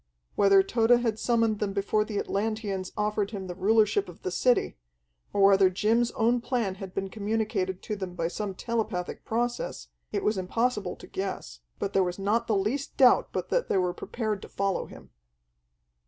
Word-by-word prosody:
Whether 195 -1 +5
Tode 230 +3 +3
had 225 -2 -1
summoned 230 -3 +1
them 200 -2 -1
before 205 +2 +1
the 210 -1 -5
Atlanteans 200 -3 -2
offered 210 -1 0
him 200 -4 -6
the 180 - -5
rulership 205 +1 +2
of 175 - -14
the 185 - -2
city, 250 +7 +2 0.6
or 200 - +2
whether 195 -1 +6
Jim's 225 +5 +2
own 235 +2 +2
plan 235 -6 -1
had 190 -1 -7
been 195 0 -1
communicated 205 -3 -2
to 215 - -3
them 190 -3 -6
by 165 -1 -1
some 195 +2 -4
telepathic 220 -5 -3
process, 235 - -2 0.2
it - - -2
was 210 -2 +1
impossible 210 +1 -1
to - - -13
guess, 185 - -5 0.2
but 200 0 -3
there 195 - +4
was 180 0 -3
not 205 +4 0
the 220 - +2
least 235 +9 -2
doubt 255 -3 +5
but - - -3
that - - 0
they - - +2
were 180 -1 +1
prepared 215 -2 -3
to - - -10
follow 195 -1 -1
him. - - -14
205 Hz, 185 wpm, -27 LUFS, 190-225 Hz, 0.6 s, whether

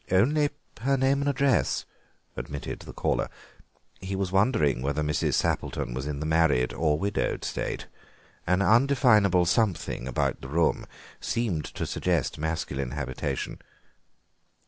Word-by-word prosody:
"Only 145 +11 +3 0.3
her 135 +4 +1
name 135 +2 +2
and 145 - +1
address," 140 -1 +1 0.5
admitted 70 0 -5
the - - -10
caller. - - -1 0.7
He 95 +1 -4
was 95 -1 -2
wondering 95 - +2
whether 70 +3 -1
Mrs. 75 0 0
Sappleton - - -1
was 65 +3 -4
in 75 -1 -3
the 75 - -3
married 80 -6 +2
or 75 -2 +1
widowed 100 +4 -1
state. - - -3 0.6
An 90 +2 +3
undefinable 110 -5 +4
something 90 - 0
about 65 - -1
the 65 - -7
room 80 +3 +1 0.3
seemed 110 -10 -1
to - - -4
suggest 85 -7 -1
masculine 75 -5 -2
habitation. 65 -3 -3
90 Hz, 130 wpm, -27 LUFS, 75-115 Hz, 0.7 s, undefinable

